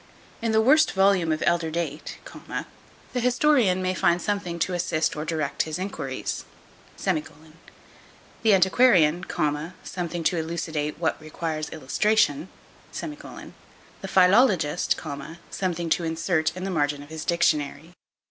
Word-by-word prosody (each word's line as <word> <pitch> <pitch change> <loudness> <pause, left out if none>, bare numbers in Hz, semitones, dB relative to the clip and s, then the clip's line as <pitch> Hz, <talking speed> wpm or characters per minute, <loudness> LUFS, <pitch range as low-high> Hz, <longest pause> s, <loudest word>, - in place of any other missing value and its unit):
In 230 -1 0
the 220 0 +4
worst 305 +7 +5
volume 190 -4 +3
of 155 - -1
elder 170 -1 +2
date, 160 -2 -4 1.0
the 250 - 0
historian 245 -6 +3
may 185 0 0
find 175 -1 +2
something 195 -3 -2
to 180 +2 -1
assist 165 -2 0
or 150 +1 -4
direct 150 -4 -1
his 155 -1 -3
enquiries; 190 +2 -4 0.5
the 160 +5 -5
antiquarian, 185 -4 +4 0.6
something 175 -2 -4
to 175 - +1
elucidate 160 -2 -3
what 160 -1 -1
requires 155 0 -4
illustration; 160 +1 +1 0.5
the 300 -1 -8 0.5
philologist, 185 - +3 0.5
something 175 -3 -2
to 175 - +2
insert 160 0 0
in 185 - -5
the 195 - -2
margin 145 -3 0
of 145 - -15
his 160 0 -6
dictionary. 160 -1 0
170 Hz, 120 wpm, -25 LUFS, 155-190 Hz, 1.0 s, worst